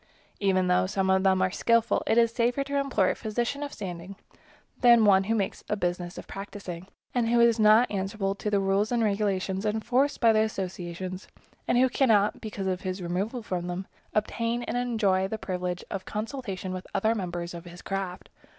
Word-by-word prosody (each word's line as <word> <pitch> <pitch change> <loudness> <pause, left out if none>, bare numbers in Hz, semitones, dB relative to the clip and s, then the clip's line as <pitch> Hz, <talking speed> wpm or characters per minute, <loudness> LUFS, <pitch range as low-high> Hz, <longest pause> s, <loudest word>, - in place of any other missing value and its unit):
Even 190 -2 +2
though 180 0 +2
some 190 -1 0
of 190 0 +3
them 190 -1 +3
are 185 - +1
skillful, 230 +3 +2
it 225 - +3
is 230 -1 +5
safer 240 +3 +1
to 280 0 -1
employ 260 -9 +2
a - - -1
physician 240 +6 -2
of 290 -1 -4
standing 185 -1 -7 0.6
than 240 -1 +7
to 225 - +4
take - - +4
one 195 -1 +6
who 225 +3 +1
makes 200 -3 -2
a - - +1
business 175 -2 -3
of - - -7
practicing, 195 -3 -7 0.3
and 235 -2 +1
who 240 0 +3
is 235 -1 +4
not 215 +3 +5
answerable 195 0 -1
to 205 +1 -4
the 205 -1 +2
rules 195 +3 +1
and 235 -1 +2
regulations 200 -2 0
enforced 245 +7 +1
by 230 -3 +5
the 215 - +3
associations, 185 -3 -3 0.4
and 240 - +2
who 260 +1 +5
cannot, 220 -6 +2
because 210 -3 -5
of 185 -1 -1
his 185 0 -3
removal 195 +7 -3
from 180 -3 -3
them, 180 +2 -4 0.3
obtain 230 +2 -1
and - - -4
enjoy 215 -6 +1
the 220 - -4
privilege 180 -3 -3
of 195 -1 -3
consultation 210 -4 -5
with 185 0 -6
other 220 +3 +2
members 175 -4 -4
of 170 0 -8
his 175 +1 -11
craft. 195 -2 -4
200 Hz, 200 wpm, -27 LUFS, 185-230 Hz, 0.6 s, than